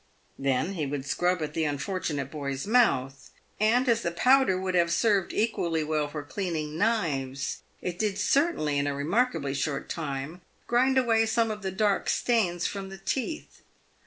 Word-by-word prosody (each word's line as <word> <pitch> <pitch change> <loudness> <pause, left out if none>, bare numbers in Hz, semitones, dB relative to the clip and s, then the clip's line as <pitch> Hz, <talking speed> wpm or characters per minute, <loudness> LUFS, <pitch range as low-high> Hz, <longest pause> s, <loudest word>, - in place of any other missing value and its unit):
Then 135 +7 0
he 155 -6 -2
would 140 -1 -4
scrub 175 +2 0
at 150 0 -4
the 160 - 0
unfortunate 145 -2 -2
boy's 140 -3 -4
mouth, 135 - +2 0.3
and, 235 +5 +3
as 230 -1 +3
the 170 - -1
powder 250 +2 +3
would 185 0 -2
have 170 -1 +3
served 205 -2 +2
equally 170 -7 0
well 150 -1 0
for 150 0 -6
cleaning 155 0 -3
knives, 150 - -1 0.2
it 180 -1 -4
did 210 -3 0
certainly 205 - +1
in 140 - 0
a 145 - -1
remarkably 165 - 0
short 140 0 -2
time 150 +2 -4 0.2
grind 260 +2 +2
away 225 -3 +3
some 225 0 +1
of 210 -1 -5
the 190 - -2
dark 200 +1 +1
stains 185 -8 +1
from 195 -1 -3
the 195 - -9
teeth. 265 - -4
175 Hz, 165 wpm, -27 LUFS, 145-220 Hz, 0.3 s, and